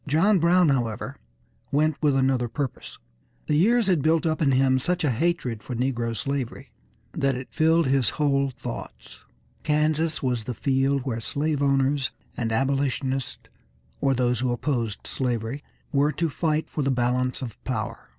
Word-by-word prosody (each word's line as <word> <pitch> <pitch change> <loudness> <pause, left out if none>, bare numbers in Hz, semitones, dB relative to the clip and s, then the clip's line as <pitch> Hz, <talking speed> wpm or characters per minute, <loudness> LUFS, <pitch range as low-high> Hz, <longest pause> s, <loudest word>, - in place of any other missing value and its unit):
John 180 +7 +4
Brown, 175 0 +4
however, 125 0 -1 0.6
went 155 +1 +2
with 145 -3 +3
another 130 -2 +2
purpose. 135 +1 -5 0.5
The - - -1
years 225 +8 +4
had 180 -6 +2
built 160 +3 +2
up 160 0 0
in 140 -3 +3
him 130 0 +3
such 180 +6 -1
a 145 - +2
hatred 125 -4 -1
for 125 - -6
negro 120 -2 -1
slavery 135 -2 -4 0.4
that 135 -1 +1
it 130 +1 -6
filled 160 +1 +3
his 130 -4 +2
whole 140 -2 +2
thoughts. 130 - -8 0.4
Kansas 155 +1 +1
was 125 -4 -1
the 125 - -4
field 135 +1 +1
where 120 -4 -2
slave 145 +4 -1
owners 140 0 +2 0.3
and 115 -2 -2
abolitionists, 135 +1 -1 0.5
or 135 -1 +2
those 125 -2 +1
who 125 0 0
opposed 120 -4 -2
slavery, 125 +2 -2 0.3
were 145 +1 +3
to 165 +3 0
fight 155 0 0
for 150 - -3
the 135 - +1
balance 125 +1 0
of 120 -4 -8
power. 110 - -4
135 Hz, 160 wpm, -25 LUFS, 125-150 Hz, 0.6 s, John